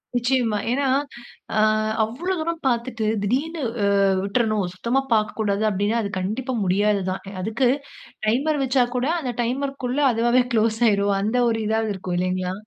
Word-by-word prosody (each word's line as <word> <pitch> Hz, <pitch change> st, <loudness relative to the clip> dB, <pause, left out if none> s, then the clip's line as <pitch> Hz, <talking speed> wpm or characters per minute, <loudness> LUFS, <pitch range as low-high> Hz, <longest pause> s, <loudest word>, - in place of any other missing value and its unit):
நிச்சயமா. 240 Hz, -3 st, +1 dB
ஏன்னா, 275 Hz, +2 st, +1 dB, 0.7 s
அ -, -, +4 dB, 0.4 s
அவ்ளோ 280 Hz, +13 st, -2 dB
தூரம் 335 Hz, +1 st, -2 dB
பாத்துட்டு 235 Hz, -2 st, -1 dB, 0.2 s
திடீர்னு, 295 Hz, +10 st, -1 dB, 0.6 s
விட்றணும். 215 Hz, -1 st, 0 dB
சுத்தமா 235 Hz, +8 st, 0 dB
பாக்க 215 Hz, -1 st, +1 dB
கூடாது 205 Hz, -1 st, 0 dB
அப்டின்னா 205 Hz, +3 st, 0 dB
அது 205 Hz, -, -3 dB
கண்டிப்பா 230 Hz, +8 st, -3 dB
முடியாததுதான். 195 Hz, 0 st, 0 dB, 0.2 s
அதுக்கு, 225 Hz, +6 st, +1 dB, 0.6 s
டைமர் 280 Hz, +6 st, +1 dB
வச்சா 260 Hz, -1 st, +3 dB
கூட 250 Hz, +2 st, 0 dB
அந்த 255 Hz, -6 st, -3 dB
டைமர்க்குள்ள 265 Hz, +1 st, -2 dB
அதுவாவே 240 Hz, +2 st, +3 dB
க்ளோஸ் 220 Hz, 0 st, +2 dB
ஆயிரும் 200 Hz, -1 st, +2 dB
அந்த 220 Hz, +5 st, 0 dB
ஒரு 225 Hz, -1 st, 0 dB
இதாவது 220 Hz, 0 st, 0 dB
இருக்கும் 180 Hz, -1 st, -4 dB
இல்லைங்களா? 185 Hz, 0 st, -1 dB
225 Hz, 135 wpm, -23 LUFS, 205-255 Hz, 0.7 s, அ